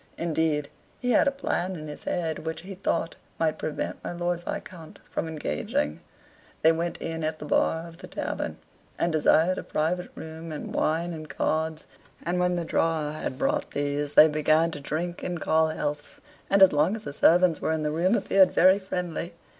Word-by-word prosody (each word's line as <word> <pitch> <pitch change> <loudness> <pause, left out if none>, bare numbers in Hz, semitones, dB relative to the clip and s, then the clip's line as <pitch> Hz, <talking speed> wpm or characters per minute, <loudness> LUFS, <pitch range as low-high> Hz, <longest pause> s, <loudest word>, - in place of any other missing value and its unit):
Indeed, 160 -3 0 0.3
he 250 0 0
had 235 - +4
a - - +4
plan 190 -9 -2
in 155 -2 -7
his 150 - -8
head, 165 -3 -1
which, 160 +1 -5
he 195 +3 -8
thought, 170 -3 -2 0.2
might 160 -1 0
prevent 155 - -4
my - - -4
Lord 175 0 -1
Viscount 165 -2 -7
from - - -2
engaging. 75 - -2 0.6
They 160 - +7
went 170 +1 -2
in 165 0 -4
at 155 0 -1
the 150 - -8
bar 160 +2 +1
of 165 0 -13
the 185 - -10
tavern, - - -4 0.4
and 170 - +1
desired 160 +3 +3
a - - -6
private 175 +4 -1
room 160 +1 -8
and 150 - -6
wine 170 +3 0
and 155 -1 -8
cards, 160 0 -1 0.4
and 175 +1 -1
when 180 0 +2
the 170 -1 -2
drawer 160 -2 0
had 150 -4 -4
brought 285 - 0
these, 145 0 -1
they 155 - +10
began 155 +2 +2
to 150 - -5
drink 170 +5 -3
and 175 -2 -3
call 160 0 +3
healths, 150 -1 -4 0.3
and 195 0 +6
as 190 - +7
long 155 +8 +3
as 220 - -8
the 145 - -6
servants 170 +1 +4
were - - 0
in 160 -1 -1
the 150 - 0
room 175 +7 +2
appeared 190 -5 +4
very 190 +2 +6
friendly. 180 -3 -4
160 Hz, 195 wpm, -27 LUFS, 155-175 Hz, 0.6 s, they